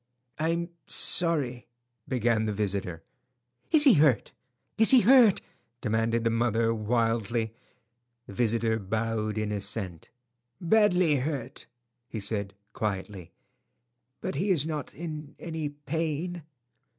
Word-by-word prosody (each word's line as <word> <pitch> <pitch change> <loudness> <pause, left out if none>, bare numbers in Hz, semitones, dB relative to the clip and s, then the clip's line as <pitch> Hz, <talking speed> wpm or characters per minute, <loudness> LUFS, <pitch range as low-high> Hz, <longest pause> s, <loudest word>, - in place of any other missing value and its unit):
"I'm 170 +2 -1 0.2
sorry—" 145 -8 +4 0.4
began 115 -3 0
the 105 - -1
visitor. 95 -5 -3 0.7
"Is 310 -2 +5
he 275 -5 +7
hurt?" 145 -6 +2 1.5
demanded 115 0 -1
the 115 - +1
mother, 115 0 +1
wildly. 115 0 -1 0.7
The - - -11
visitor 115 0 0
bowed 110 +1 -3
in 110 -1 -2
assent. 100 -4 -4 0.5
"Badly 180 -5 +3
hurt," 140 +1 -5 0.4
he 115 - -6
said, 100 -1 -2 0.2
quietly, 100 -3 -5 0.9
"but - - -4
he 180 +9 -2
is 160 -6 +3
not 155 -4 -5
in 155 -2 -7
any 160 -3 -5
pain." 160 +4 -4
115 Hz, 100 wpm, -27 LUFS, 110-155 Hz, 1.5 s, he